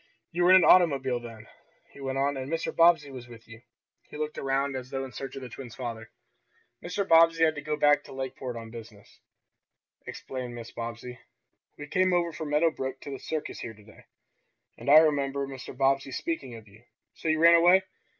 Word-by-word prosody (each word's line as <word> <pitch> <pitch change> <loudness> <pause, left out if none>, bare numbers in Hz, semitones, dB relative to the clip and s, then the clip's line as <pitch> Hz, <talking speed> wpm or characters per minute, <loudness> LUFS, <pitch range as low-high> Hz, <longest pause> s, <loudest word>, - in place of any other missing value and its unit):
"You 175 0 0
were - - +5
in 185 - +9
an 185 - +6
automobile 135 -8 +4
then," 115 -2 -11 0.5
he - - -14
went 135 0 -3
on, 140 +1 0
"and 135 +2 -6
Mr. 165 0 -3
Bobbsey 165 -4 +4
was 125 -2 -9
with 115 -1 -14
you." 115 0 -13 0.5
He - - -9
looked 155 0 -4
around 135 0 -1
as 130 -1 -6
though 135 0 -3
in 130 - -10
search 135 +5 -7
of 135 - -7
the - - -6
twins' 120 -1 -10
father. 115 -3 -6 0.7
"Mr. 195 +3 -3
Bobbsey 165 0 +5
had 160 -1 +4
to 145 - -7
go 150 0 -3
back 145 0 +4
to - - -13
Lakeport 130 -2 -6
on 115 -1 -8
business," 110 -3 -13 0.9
explained 125 -2 -7
Mrs. 115 -1 -9
Bobbsey. 115 +1 -7 0.6
"We 145 - -7
came 185 +4 +1
over 170 -2 0
from 155 -1 -6
Meadow 155 +3 +2
Brook 130 -2 -5
to 140 - -8
the 135 - -6
circus 155 +3 -5
here 110 - -7
to 105 - -18
day. 105 - -18 0.7
And - - -6
I 150 - +9
remember 140 -3 +2
Mr. 135 -2 -9
Bobbsey 135 0 +1
speaking 135 -5 -4
of 110 -1 -13
you. 105 +2 -19 0.3
So - - -7
you 160 0 +2
ran 170 +1 +6
away?" 175 +3 +6
135 Hz, 210 wpm, -27 LUFS, 125-155 Hz, 0.9 s, in